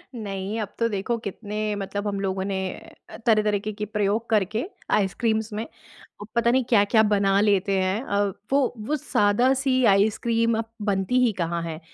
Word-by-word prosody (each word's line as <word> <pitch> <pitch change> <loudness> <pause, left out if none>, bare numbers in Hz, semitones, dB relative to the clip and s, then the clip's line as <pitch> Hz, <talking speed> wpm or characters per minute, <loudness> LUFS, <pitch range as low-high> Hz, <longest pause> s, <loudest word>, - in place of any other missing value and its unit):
नहीं, 200 0 -4
अब 210 - -6
तो 230 - +3
देखो 210 +3 -2
कितने 210 0 -6 0.2
मतलब 200 +1 -4
हम 200 -1 -2
लोगों 190 -1 -2
ने 195 -1 -2 0.7
तरह-तरह 215 -2 +3
के 215 +1 -4
के 210 +1 -4
प्रयोग 210 +2 -1
करके 215 - +1 0.3
आइसक्रीम्स 220 +2 +1
में, 220 +2 -3 0.7
पता 235 0 +3
नहीं 260 +1 +2
क्या-क्या 220 0 +4
बना 200 -2 +2
लेते 200 -2 +2
हैं। 190 +4 0
अ, 200 - -2 0.3
वो 275 -3 +2
वो 305 - +1
सादा-सी 255 +2 +2
आइसक्रीम 225 +3 +2
अब 225 0 -4 0.2
बनती 195 +5 +1
ही 230 - +2
कहाँ 170 0 -1
है? 160 -2 -5
210 Hz, 160 wpm, -24 LUFS, 195-230 Hz, 0.7 s, क्या-क्या